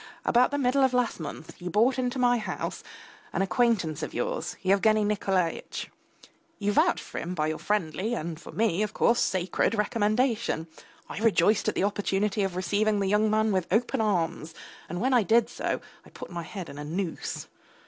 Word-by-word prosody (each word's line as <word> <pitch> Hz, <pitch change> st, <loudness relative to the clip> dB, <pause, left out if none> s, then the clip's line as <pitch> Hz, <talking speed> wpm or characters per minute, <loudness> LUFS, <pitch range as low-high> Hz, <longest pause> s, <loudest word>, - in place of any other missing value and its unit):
About 245 Hz, +1 st, +4 dB
the 285 Hz, -, -2 dB
middle 270 Hz, 0 st, +2 dB
of 260 Hz, -1 st, +3 dB
last 250 Hz, -6 st, +1 dB
month, 160 Hz, +1 st, -8 dB
you 180 Hz, -, -4 dB
brought 235 Hz, +7 st, +3 dB
into 250 Hz, 0 st, -1 dB
my 245 Hz, -1 st, +3 dB
house 210 Hz, -, -4 dB, 0.5 s
an 195 Hz, -, +1 dB
acquaintance 195 Hz, -, +1 dB
of -, -, -5 dB
yours, -, -, -2 dB
Yevgeny 210 Hz, +3 st, +3 dB
Nikolaitch; 190 Hz, -4 st, -1 dB, 0.7 s
you 205 Hz, 0 st, 0 dB
vouched -, -, +2 dB
for -, -, -6 dB
him 180 Hz, +2 st, -4 dB
by 155 Hz, -2 st, 0 dB
your 155 Hz, 0 st, -2 dB
friendly 205 Hz, +3 st, -1 dB
and, 165 Hz, -3 st, -5 dB
for -, -, -10 dB
me, 210 Hz, -4 st, +1 dB
of 215 Hz, 0 st, -2 dB
course, 235 Hz, +1 st, +3 dB
sacred 185 Hz, +3 st, +1 dB
recommendation; 215 Hz, -2 st, +1 dB, 0.4 s
I -, -, -6 dB
rejoiced 215 Hz, -1 st, +3 dB
at -, -, -4 dB
the -, -, +1 dB
opportunity 205 Hz, +1 st, 0 dB
of 195 Hz, -2 st, -1 dB
receiving 205 Hz, +3 st, +1 dB
the 200 Hz, -, 0 dB
young 210 Hz, +2 st, +3 dB
man 215 Hz, 0 st, +2 dB
with 185 Hz, -3 st, 0 dB
open 225 Hz, +2 st, +1 dB
arms, 170 Hz, -6 st, -1 dB, 0.3 s
and 175 Hz, +2 st, -4 dB
when 260 Hz, +5 st, +1 dB
I 245 Hz, -, +5 dB
did 225 Hz, +4 st, +3 dB
so -, -, -2 dB, 0.2 s
I -, -, -16 dB
put -, -, -10 dB
my 175 Hz, -1 st, -4 dB
head 180 Hz, +1 st, -7 dB
in 140 Hz, -, -9 dB
a -, -, -5 dB
noose. 170 Hz, +3 st, -4 dB
210 Hz, 190 wpm, -27 LUFS, 180-230 Hz, 0.7 s, I